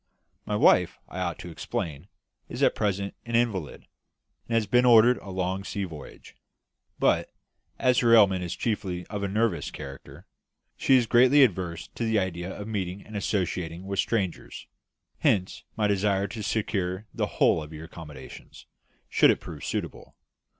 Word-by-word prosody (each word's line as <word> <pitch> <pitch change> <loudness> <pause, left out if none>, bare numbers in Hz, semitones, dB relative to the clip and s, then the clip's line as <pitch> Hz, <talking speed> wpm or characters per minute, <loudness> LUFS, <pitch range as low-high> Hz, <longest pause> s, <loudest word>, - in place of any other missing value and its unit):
My 105 - -1
wife, 90 -4 +4
I 95 - -7
ought 85 -2 -2
to 85 - -9
explain, 80 0 -5 0.4
is - - -3
at - - +5
present 100 -2 -1
an 115 -1 -3
invalid, 110 -10 -1 0.6
and 115 - -1
has 115 -2 +2
been 125 +5 +3
ordered 120 0 +6
a 100 - -11
long 95 +1 -2
sea 100 0 -4
voyage; 80 -6 -10 0.6
but, - - +2 0.5
as 125 -1 +3
her 115 -1 +5
ailment 95 -4 +5
is 90 0 -4
chiefly 95 -4 -3
of 105 -1 -3
a 100 - -1
nervous 100 -6 0
character, 70 0 -10 0.5
she 135 - +3
is 120 - +2
greatly 130 +5 +6
averse 90 -7 -1
to - - -5
the 110 -1 +1
idea 95 -2 -2
of 105 +1 -7
meeting 100 -3 -4
and 110 - -11
associating 90 -4 -2
with 100 0 -3
strangers; 100 -6 -2 0.5
hence 95 -2 0
my 105 - +1
desire 100 -1 +1
to 110 +2 -6
secure 100 -2 -2
the - - -1
whole 80 - +4
of 75 0 -9
your 80 0 -8
accommodation, 75 -5 -11 0.6
should - - +4
it - - +3
prove - - -9
suitable. - - -5
100 Hz, 165 wpm, -27 LUFS, 90-110 Hz, 0.6 s, ordered